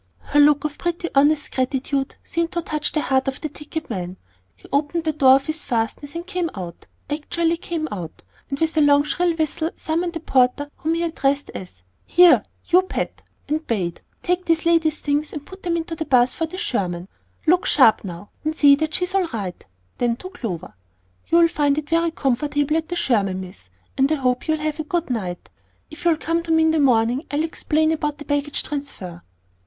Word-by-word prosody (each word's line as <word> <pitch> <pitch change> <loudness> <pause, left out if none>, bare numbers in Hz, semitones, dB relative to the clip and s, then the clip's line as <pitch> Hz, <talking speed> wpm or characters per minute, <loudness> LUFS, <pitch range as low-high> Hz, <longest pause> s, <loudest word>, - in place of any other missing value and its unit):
Her 290 - +1
look 290 0 +5
of 300 -1 -4
pretty 345 0 -2
honest 290 +2 +3
gratitude 270 +1 -1
seemed 335 0 -2
to 345 -1 -1
touch 305 -1 -2
the 305 - 0
heart 265 0 +1
of 270 0 -2
the 310 - -4
ticket 305 +2 -7
man. 185 -4 -5 0.4
He - - -17
opened 295 +4 +1
the 315 -1 0
door 265 -3 +6
of 275 0 0
his 310 0 -1
fastness, 245 +6 -2
and 340 +1 -4
came 360 -3 -2
out 175 -3 -8 0.2
actually 325 +3 -1
came 330 -2 -3
out! 175 -6 -7 0.3
and 275 -1 -3
with 320 0 +1
a 310 - +4
long 285 -1 +5
shrill 345 +3 0
whistle 315 0 -1
summoned 340 +1 -2
a - - -2
porter 275 0 +2
whom 320 +1 -1
he 335 - -1
addressed 285 -4 0
as, 180 - -10 0.2
"Here, 355 -1 +6 0.3
you 360 +1 +6
Pat," 375 - -4 0.3
and 310 +2 -2
bade, 180 -7 -2 0.2
"Take 360 +1 0
this 330 -1 +1
lady's 325 -2 +3
things, 295 +1 -1
and 290 -1 -6
put 380 0 -12
them 340 -2 0
into 330 0 -4
the 315 - -4
'bus 250 -2 +4
for 325 - -2
the 365 - -8
Sherman; 180 - -2 0.4
look 355 +3 +3
sharp 240 -7 +5
now, 180 +1 -8
and 310 +1 -1
see 285 -3 +7
that 315 0 -2
she's 360 +1 0
all 385 -3 +2
right." 200 - -5 0.4
Then 240 -1 +1
to 370 +10 -9
Clover, 215 - -5 0.5
"You'll 335 0 +5
find 290 -3 +1
it 305 -1 -3
very 335 0 +3
comfortable 290 +1 0
at 320 0 -1
the 350 - -2
Sherman, 200 - +1
Miss, 180 - -10 0.3
and 270 +3 +4
I - - +4
hope 250 -2 0
you'll 315 0 +2
have 305 0 -3
a - - -1
good 335 -2 -2
night. 185 -7 -4 0.4
If 310 - -10
you'll 335 -2 +4
come 330 +2 -1
to 335 -1 -4
me 320 0 +4
in 320 - +4
the 320 - +1
morning, 245 0 +3
I'll 295 +2 0
explain 315 -1 +1
about 300 -2 -1
the 295 - -10
baggage 290 0 -1
transfer." 200 - -6
300 Hz, 205 wpm, -22 LUFS, 260-330 Hz, 0.5 s, see